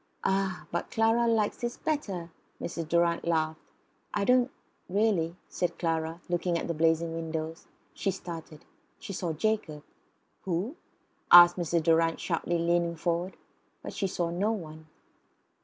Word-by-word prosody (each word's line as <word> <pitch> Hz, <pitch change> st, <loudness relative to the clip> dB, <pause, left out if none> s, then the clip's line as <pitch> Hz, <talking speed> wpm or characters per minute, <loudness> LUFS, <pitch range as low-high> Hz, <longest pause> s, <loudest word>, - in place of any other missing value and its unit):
"Ah! 195 Hz, -1 st, 0 dB
but 170 Hz, -, -2 dB
Clara 225 Hz, +1 st, +3 dB
likes 220 Hz, -3 st, +1 dB
this 240 Hz, 0 st, -4 dB
better," 195 Hz, -, -3 dB, 0.3 s
Mrs. 165 Hz, -2 st, -5 dB
Durrant 170 Hz, 0 st, +2 dB
laughed. 160 Hz, -1 st, +1 dB, 0.6 s
"I 205 Hz, -, +1 dB
don't 250 Hz, +1 st, +5 dB
know -, -, -17 dB, 0.4 s
really," 185 Hz, -4 st, +1 dB
said 175 Hz, -, -2 dB
Clara, 165 Hz, 0 st, -1 dB
looking 175 Hz, 0 st, 0 dB
at -, -, -3 dB
the 170 Hz, -, -1 dB
blazing 165 Hz, +1 st, +2 dB
windows. 160 Hz, 0 st, -4 dB, 0.3 s
She -, -, -1 dB
started. 165 Hz, -4 st, -7 dB, 0.3 s
She 195 Hz, -, -7 dB
saw 175 Hz, -2 st, -2 dB
Jacob. 155 Hz, -5 st, -1 dB, 0.6 s
"Who?" 190 Hz, -, -2 dB, 0.6 s
asked 175 Hz, 0 st, +10 dB
Mrs. 170 Hz, -2 st, 0 dB
Durrant 165 Hz, 0 st, +3 dB
sharply, 170 Hz, 0 st, -1 dB
leaning 170 Hz, 0 st, +1 dB
forward. 170 Hz, +3 st, -2 dB, 0.5 s
But -, -, -6 dB
she 195 Hz, -, -1 dB
saw 175 Hz, -2 st, -2 dB
no 195 Hz, +6 st, +1 dB
one. 160 Hz, -6 st, -7 dB
170 Hz, 140 wpm, -29 LUFS, 165-195 Hz, 0.6 s, asked